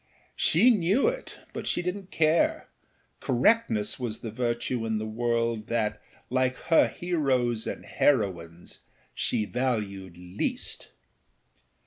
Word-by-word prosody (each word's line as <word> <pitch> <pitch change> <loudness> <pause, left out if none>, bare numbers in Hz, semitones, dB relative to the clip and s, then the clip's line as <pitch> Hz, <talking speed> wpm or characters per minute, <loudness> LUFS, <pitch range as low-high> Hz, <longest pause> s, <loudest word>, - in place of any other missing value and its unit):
She 215 +11 +5
knew 205 +4 +2
it, - - -7 0.2
but - - -5
she 175 - 0
didnât 185 +1 -4
care; 160 +1 +2 0.5
correctness 120 - +2
was 115 -3 -4
the 115 - -5
virtue 120 +1 -1
in 110 -1 -1
the 110 - -3
world 115 0 -1
that, 105 -2 -1 0.3
like 130 0 +1 0.2
her - - +7
heroes 130 -10 0
and - - -5
heroines, 90 - 0 0.3
she 110 - 0
valued 105 -7 -2
least. 90 +2 -4
120 Hz, 115 wpm, -27 LUFS, 110-155 Hz, 0.5 s, her